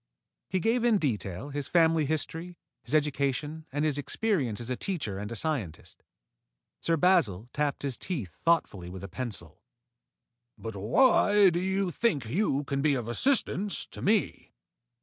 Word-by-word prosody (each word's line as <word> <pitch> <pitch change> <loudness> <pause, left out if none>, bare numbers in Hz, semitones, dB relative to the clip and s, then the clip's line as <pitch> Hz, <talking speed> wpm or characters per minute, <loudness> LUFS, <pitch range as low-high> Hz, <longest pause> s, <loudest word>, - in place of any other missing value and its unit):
He 190 - 0
gave 230 +5 +1
in 235 -3 +4
detail 115 - -2
his 145 -1 -4
family 165 -3 +3
history, 165 +3 -3 0.2
his 120 +6 -3
education, 150 +1 -1
and 145 +3 0
his 145 -2 +1
experience 145 - -1
as 120 +1 -5
a - - 0
teacher 125 - -3
and 105 +2 -5
a - - -4
scientist. 115 - -3 0.8
Sir 165 0 +1
Basil 125 - +2
tapped 145 -1 -1
his 135 -4 -2
teeth 130 - -4
thoughtfully 105 - +1
with 95 +1 -8
a - - -5
pencil. 95 -5 -7 1.0
"But 110 -2 -7
why 205 - +4
do 170 - 0
you 190 0 0
think 160 - 0
you 145 - 0
can 140 -1 -2
be 145 -1 +3
of 120 -3 -3
assistance 205 - +1
to - - -9
me?" 210 - 0
145 Hz, 155 wpm, -28 LUFS, 115-180 Hz, 1.0 s, in